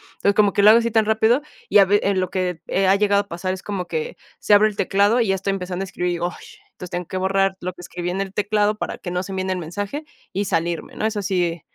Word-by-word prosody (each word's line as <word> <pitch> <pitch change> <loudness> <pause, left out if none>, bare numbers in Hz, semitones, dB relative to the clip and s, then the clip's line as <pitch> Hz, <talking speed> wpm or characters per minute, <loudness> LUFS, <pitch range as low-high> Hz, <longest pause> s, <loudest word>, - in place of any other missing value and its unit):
entonces, 200 - +1
como 205 -2 +4
que 200 - +2
lo 210 - +9
hago 230 - +6
así 235 0 0
tan 220 -1 +2
rápido, 220 +5 +2 0.3
y - - +5
a 195 - +7
ve 205 +2 +3
en 195 -1 +1
lo 185 -1 -2
que, 180 -3 -2
eh, 190 0 +1
ha 195 - +5
llegado 200 0 +3
a 200 - -13
pasar 185 +1 -3
es 190 - -7
como 195 -3 -4
que 160 -2 -4 0.2
se 205 - +4
abre 215 +1 +5
el 210 - -10
teclado 200 +5 +2
y 225 - +1
ya 195 - +2
estoy 195 +1 -2
empezando 185 -1 -3
a - - -4
escribir, 175 -1 -2
ay, 175 - 0 0.4
entonces 180 - -10
tengo 175 0 -4
que 185 - -4
borrar 195 0 +1
lo 180 0 -4
que 175 - -13
escribí 175 0 -5
en 190 +2 -2
el 195 0 -5
teclado 210 0 +1
para - - -4
que 175 - -7
no 180 0 -1
se 195 - -7
envíe 190 0 -2
el 185 - -1
mensaje 205 - -5 0.3
y 200 +2 -1
salirme, 170 -1 -2
¿no?, 215 - -2
eso 215 -2 -1
sí 175 -4 -1
195 Hz, 280 wpm, -22 LUFS, 180-205 Hz, 0.4 s, lo